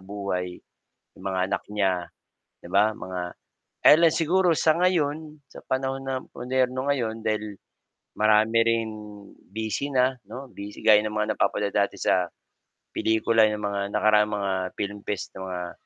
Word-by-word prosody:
buhay, 95 Hz, -2 st, -4 dB, 0.6 s
'yong -, -, -14 dB
mga 95 Hz, -1 st, -1 dB
anak -, -, -1 dB
niya, 100 Hz, -3 st, +2 dB, 0.7 s
'di -, -, -9 dB
ba 105 Hz, +2 st, +4 dB
mga, 90 Hz, 0 st, -5 dB, 0.7 s
ele 165 Hz, +3 st, +8 dB
siguro 175 Hz, +3 st, +2 dB
sa 155 Hz, -, +4 dB
ngayon, 155 Hz, -4 st, 0 dB
sa -, -, -12 dB
panahon 135 Hz, 0 st, -1 dB
na 130 Hz, -1 st, -1 dB, 0.2 s
moderno 130 Hz, +1 st, -1 dB
ngayon 115 Hz, -5 st, -1 dB
dahil, 110 Hz, -2 st, -2 dB, 0.6 s
marami 110 Hz, +1 st, +4 dB
ring 115 Hz, -1 st, +1 dB, 0.6 s
busy 110 Hz, +5 st, -2 dB
na 130 Hz, +1 st, +3 dB
'no, 130 Hz, +4 st, -8 dB
busy 100 Hz, +1 st, -9 dB
gaya 105 Hz, -1 st, +7 dB
ng 105 Hz, 0 st, -3 dB
mga 105 Hz, 0 st, 0 dB
napapanood 100 Hz, -1 st, +1 dB
dati 100 Hz, -1 st, +1 dB
sa, 90 Hz, -2 st, +1 dB, 0.7 s
pelikula 110 Hz, 0 st, +3 dB
ng 105 Hz, 0 st, -4 dB
mga 100 Hz, -1 st, -1 dB
nakaraang 105 Hz, 0 st, +4 dB
mga 100 Hz, -1 st, -1 dB, 0.3 s
film 100 Hz, 0 st, -3 dB
fest 100 Hz, -3 st, -3 dB
'no, 95 Hz, -, -6 dB
ah, 90 Hz, -1 st, -4 dB
110 Hz, 150 wpm, -25 LUFS, 100-130 Hz, 0.7 s, ele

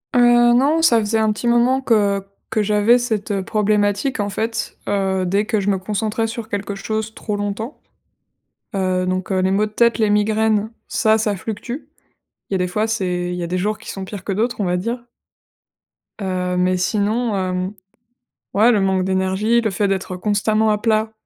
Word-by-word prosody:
Heu, 240 Hz, 0 st, +6 dB
non, 290 Hz, +6 st, +3 dB
ça 235 Hz, -8 st, +5 dB
faisait 220 Hz, +1 st, 0 dB
un 220 Hz, -1 st, +2 dB
petit 225 Hz, +3 st, -3 dB
moment 245 Hz, +3 st, +3 dB
que 205 Hz, -5 st, +2 dB, 0.3 s
que 215 Hz, -, +1 dB
j'avais 210 Hz, +3 st, +4 dB
cette, 220 Hz, -4 st, -2 dB
heu, 195 Hz, -1 st, -1 dB
problématique, 210 Hz, +3 st, +1 dB
en 205 Hz, -, -2 dB
fait. 225 Hz, +3 st, -3 dB
Heu, 190 Hz, -2 st, 0 dB
dès 200 Hz, +4 st, +1 dB
que 215 Hz, -2 st, 0 dB
je 200 Hz, +1 st, -1 dB
me 195 Hz, -, +2 dB
concentrais 215 Hz, +3 st, -2 dB
sur 225 Hz, -1 st, -6 dB
quelque 205 Hz, -2 st, -4 dB
chose 220 Hz, +2 st, -3 dB
trop 210 Hz, -, -4 dB
longtemps. 205 Hz, +5 st, -4 dB, 0.9 s
Heu, 185 Hz, -1 st, 0 dB
donc, 185 Hz, +1 st, -2 dB
heu, 190 Hz, -, +1 dB
les 185 Hz, -, +2 dB
maux 205 Hz, +2 st, +2 dB
de 210 Hz, -, -8 dB
tête, 235 Hz, +2 st, +3 dB
les 215 Hz, -2 st, +2 dB
migraines, 215 Hz, +1 st, +1 dB, 0.2 s
ça, 220 Hz, 0 st, +2 dB
ça 210 Hz, -2 st, 0 dB
fluctue. 225 Hz, -, -6 dB, 0.6 s
Il -, -, -3 dB
y -, -, +2 dB
a -, -, +2 dB
des 180 Hz, 0 st, 0 dB
fois, 215 Hz, +4 st, -1 dB
c'est 180 Hz, -5 st, -1 dB
il -, -, -3 dB
y 175 Hz, -, -4 dB
a -, -, -3 dB
des 180 Hz, +1 st, -2 dB
jours 210 Hz, +3 st, -1 dB
qui 220 Hz, -, -11 dB
sont 195 Hz, -1 st, -5 dB
pires 195 Hz, -1 st, -8 dB
que 200 Hz, -, -3 dB
d'autres, 220 Hz, +2 st, -1 dB
on -, -, 0 dB
va 180 Hz, 0 st, +1 dB
dire. 235 Hz, +6 st, -3 dB, 1.2 s
Heu, 180 Hz, -2 st, -2 dB
mais 180 Hz, 0 st, +2 dB
sinon, 215 Hz, +4 st, 0 dB
hem, 185 Hz, +1 st, -2 dB, 0.8 s
ouais, 225 Hz, +4 st, +5 dB
le 210 Hz, -, +3 dB
manque 190 Hz, -1 st, +1 dB
d'énergie, 190 Hz, +5 st, +1 dB
le 220 Hz, -3 st, -1 dB
fait 200 Hz, +2 st, 0 dB
d'être 190 Hz, -1 st, -2 dB
constamment 215 Hz, +3 st, +1 dB
à 210 Hz, -, +2 dB
plat, 220 Hz, 0 st, +1 dB
210 Hz, 200 wpm, -20 LUFS, 190-225 Hz, 1.2 s, Heu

